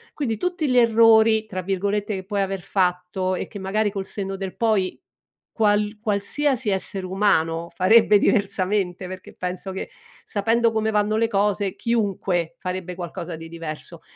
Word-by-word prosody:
quindi 230 -8 -2
tutti 350 +1 -1
gli 250 - +1
"errori" 225 -1 +5
tra 185 -4 -5
virgolette, 200 +3 -1
che 190 -1 -6
puoi 200 0 -1
aver 195 -1 -2
fatto 185 0 0
e - - -4
che 205 - -9
magari 205 +2 0
col 195 -2 -4
senno 195 -1 -3
del 190 -1 -5
poi 215 -5 +1 0.5
qual 210 -1 +1
qualsiasi 230 +4 0
essere 190 0 -2
umano 170 -4 +1
farebbe 210 +2 +6
diversamente, 195 -3 0
perché 185 0 -9
penso 180 +1 -4
che 190 - -5 0.3
sapendo 225 +3 +1
come 220 0 0
vanno 210 0 +1
le 230 - +2
cose 200 -1 0
chiunque 195 -7 -1
farebbe 180 -1 -4
qualcosa 175 -1 -6
di 165 0 -9
diverso, 165 -2 -7
200 Hz, 155 wpm, -23 LUFS, 185-220 Hz, 0.5 s, farebbe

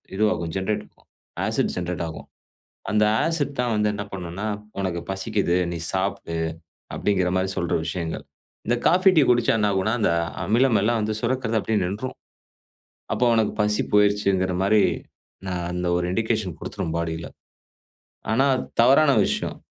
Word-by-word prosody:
இதுவாகும், 105 -5 0
ஜென்ரேட் 95 +2 -1
இருக்கும். - - -25 0.4
Acid - - 0
generate 90 -1 -3
ஆகும். 80 - -9 0.6
அந்த 105 0 +3 0.2
ஆசிட் 150 -4 -1
தான் 120 -1 +1
வந்து 105 0 +2
என்ன 100 - -4
பண்ணுன்னா, 90 +2 -5 0.3
"உனக்கு 90 -3 -1
பசிக்குது 95 -1 0 0.2
நீ 85 - -3
சாப்டு", 95 -3 -2 0.6
அப்டிங்குற 95 -3 +1
மாரி 95 +1 +1
சொல்ற 85 - 0
விஷயங்கள். 85 -1 -3 0.4
இந்த 120 - +2
காஃபி 185 +2 +5
டீ 155 - +7
குடிச்சா 120 -1 +3
என்னாகுன்னா 100 0 +1
அந்த 105 - +3 0.3
அமிலம் 115 +2 +3
எல்லாம் 115 +1 +2
வந்து 110 0 -1
சுரக்கிறது 115 -2 0
அப்படியே 110 0 0
நின்றும். 110 +8 -4 1.0
அப்போ 115 +3 +1
உனக்கு 110 -2 +2
பசி 105 0 +1
போயிருச்சுங்கிற 100 -3 +3
மாரி 105 +1 +4 0.7
நான் 90 -2 -2
அந்த 90 0 -2
ஒரு 90 - -1
இண்டிகேஷன் 110 -5 -1
குடுத்ரும் 80 0 -4
பாடியில. 85 0 -3 1.1
ஆனா 135 +5 +3 0.3
தவறான 140 +5 +6 0.2
விஷயம், - - -2
105 Hz, 140 wpm, -24 LUFS, 90-115 Hz, 1.1 s, டீ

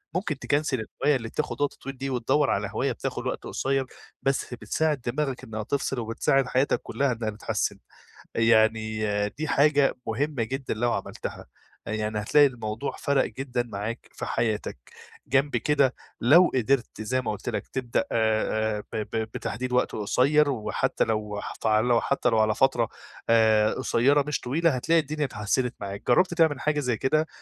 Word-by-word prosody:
ممكن 175 -6 -2
تكَنسِل 145 -3 0 0.2
الهواية 150 - +4
اللي 115 -2 -7
بتاخد 150 +2 -3
وقت 145 - +1
طويل 135 0 -8
دي 135 +1 -3
وتدوَّر 135 +3 +1
على - - 0
هواية - - 0
بتاخد - - -4
وقت - - -3
قصيّر، 135 0 -1 0.4
بس 135 -2 0
بتساعد 150 +3 -1
دماغك 135 +1 -2
إنّها 110 -1 -5
تفصِل 135 +2 -2
وبتساعد 120 +4 +1
حياتَك 130 +3 +1
كلّها 140 -1 -1
إنّها 115 -2 -3
تتحسن. 105 0 -2 0.6
يعني 110 -1 +3 0.3
دي 155 +9 -5
حاجة 145 0 +3
مهمَّة 135 +2 -1
جدًا 135 +4 -3
لو 120 +2 0
عملتها، - - -5 0.4
يعني 110 0 -2
هتلاقي 145 +7 +5
الموضوع 115 0 -4
فَرَق 140 -1 +1
جدًا 125 +1 -3
معاك 110 0 -6
في - - -5
حياتك، 110 - -1 0.5
جَنب 135 +2 +2
كده 140 -3 +2 0.3
لو 165 +9 +6
قدِرت 125 -2 0
زي 130 +4 0
ما 115 - -2
قُلت 105 - -5
لَك - - -3
تبدأ 125 -3 -1
آآ 110 -1 +1
آآ 105 - -6
ب - - -4 0.2
ب 110 0 -1
بتحديد 125 +4 -4
وقت 125 - +2
قصيّر 140 +8 +3
وحتّى 120 -6 0
لو 105 -2 -2
حتع 110 -1 0
لو 120 +1 +3
حتّى 140 - +1
لو 115 -2 +2
على 110 0 +3
فترة 120 -3 +2 0.4
آآ 110 -2 +4
قصيّرة 140 +5 +2
مش 150 - -1
طويلة 165 +7 +1
هتلاقي 165 +7 +3
الدنيا 150 0 -2
اتحسنت 120 +2 -1
معاك، 100 0 -6
جرَّبت 175 +8 +4
تعمل 160 -5 +3
حاجة 150 -1 +1
زي 125 -5 0
كده؟ 155 +6 +1
125 Hz, 165 wpm, -26 LUFS, 110-140 Hz, 0.6 s, لو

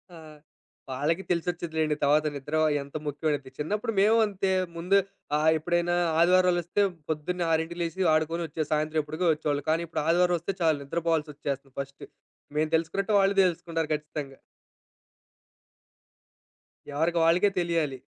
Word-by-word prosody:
ఆ! - - -11 0.7
వాళ్లకి 155 +8 -1
తెలిసొచ్చేదిలెండి. 165 -3 -1
తర్వాత 150 +2 +4
నిద్ర 145 +3 -3 0.2
ఎంత 140 +1 -12
ముఖ్యమైనది. 145 -2 -2
చిన్నప్పుడు 210 +9 -2
మేము 220 +3 +5
అంతే. 195 -2 -1 0.2
ముందు 180 +4 +2 0.4
ఆహ్, 155 +1 +3
ఎప్పుడైనా 175 +2 0 0.2
ఆదివారాలొస్తే 180 +1 +3 0.3
పొద్దున్నే 165 +3 -2
6కి 160 +2 -1
లేసి 170 +2 0
ఆడుకొని 160 +2 0
వచ్చే 155 +1 -3
సాయంత్రం 155 +1 +1
ఎప్పుడుకో 155 +4 -2
వచ్చేవాళ్లం. 145 -2 -2
కానీ 165 +1 +1
ఇప్పుడు 160 - -3
ఆదివారం 175 +1 +3
వస్తే 170 +4 -3
చాలు 160 -3 +3
నిద్రపోవాల్సొచ్చేస్తుంది 150 -3 -3
ఫస్ట్ 140 0 -10 0.5
మేము 155 +1 +1
తెలుసుకున్నట్టే 180 +6 -1
వాళ్లు 195 0 +3
తెలుసుకుంటారు 165 -2 -1
ఖచ్చితంగా. 150 -2 -5 2.6
ఎవరికి 165 +4 0
వాళ్ళకే 175 +5 +4
తెలియాలి. 165 -6 0
160 Hz, 125 wpm, -27 LUFS, 150-175 Hz, 2.6 s, మేము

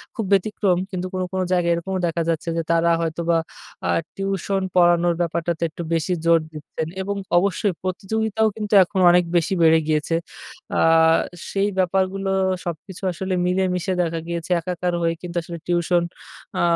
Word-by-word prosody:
খুব 225 - -2
ব্যতিক্রম 195 -2 +2
কিন্তু 185 0 -3
কোনো, 185 0 -1
কোনো, 185 0 0
জায়গায় 175 -1 +2
এরকমও 185 +2 -3
দেখা 170 0 -1
যাচ্ছে 165 +1 -1
যে - - +1
তারা 170 0 +3
হয়তো 165 +1 -2
বা 165 - +4 0.5
আ - - 0 0.3
টিউশন 195 0 -1
পড়ানোর 175 -1 +4
ব্যাপারটাতে 170 0 -1
একটু 165 - -8
বেশি 165 +3 0
জোর 165 0 +5
দিচ্ছেন, 155 +1 -6
এবং 200 +1 -3 0.2
অবশ্যই 195 +1 +1
প্রতিযোগিতাও 220 +4 0
কিন্তু 210 -1 -4
এখন 190 +2 -3
অনেক 180 0 +5
বেশি 170 +3 +1
বেড়ে 160 0 +6
গিয়েছে। 155 +1 +1 0.6
আ - - +2 0.7
সেই 200 +1 +1
ব্যাপারগুলো 190 +1 0 0.4
সবকিছু 175 +3 -7
আসলে 190 +2 -3
মিলেমিশে 185 0 0
দেখা 165 -1 -1
গিয়েছে 170 +1 -4
একাকার 180 +1 -2
হয়ে 165 0 +1
কিন্তু 175 -1 -7
আসলে 170 +1 -7
টিউশন 175 0 +2 0.6
আ - - +2
180 Hz, 160 wpm, -22 LUFS, 170-190 Hz, 0.7 s, বেড়ে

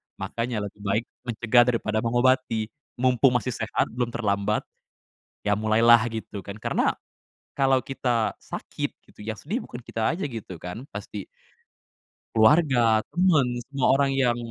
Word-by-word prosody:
makanya 115 -2 -3
lebih 105 0 -8
baik 100 +3 +1 0.2
mencegah 120 +1 +4
daripada 110 -3 0
mengobati, 120 -2 +2 0.3
mumpung 125 0 +4
masih 125 +1 0
sehat - - -1
belum 120 +1 -1
terlambat, 105 -2 0 0.8
ya 105 - +3
mulailah 110 +2 +6
gitu 110 -3 -6
kan 100 +1 -7
karena, - - +1 0.6
kalau 135 -1 +3
kita 120 -4 0
sakit - - -5 0.2
gitu - - -16
yang 110 +1 -5
sedih 210 - -3
bukan - - -9
kita 110 -1 -1
aja 170 +2 -2
gitu 115 -9 -6
kan 90 +7 -7
pasti 100 0 -7 1.1
keluarga, 120 -2 +5
temen 175 -6 +3 0.2
semua 135 -1 0
orang 140 0 +2
yang 130 -3 +2
115 Hz, 135 wpm, -25 LUFS, 110-130 Hz, 1.1 s, mulailah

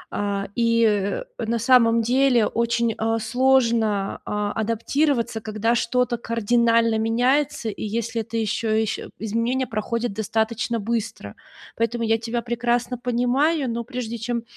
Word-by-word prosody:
э, 200 -1 -1
и, 230 -1 +2
э, 205 - 0 0.2
на 230 +1 -1
самом 230 -1 +4
деле 250 -1 +3
очень, 235 0 0
а, 225 +1 +1
сложно, 230 -4 +1
а, 210 0 -2
адаптироваться, 230 +2 0
когда 215 +2 0
что-то 245 +1 0
кардинально 230 0 +2
меняется, 245 +2 +1
и 210 - -6
если 225 +1 -2
это 230 +1 -5
еще 220 0 0
ещ 220 - -2 0.2
изменения 230 +4 -1
проходят 230 +1 -2
достаточно 220 +2 -1
быстро. 210 - -4 0.4
Поэтому 230 +1 -1
я 225 0 +2
тебя 235 +1 -3
прекрасно 240 +1 -1
понимаю. 250 +4 +1
Но 235 0 -3
прежде 240 -2 -5
чем, 235 0 -2
230 Hz, 130 wpm, -23 LUFS, 220-240 Hz, 0.4 s, самом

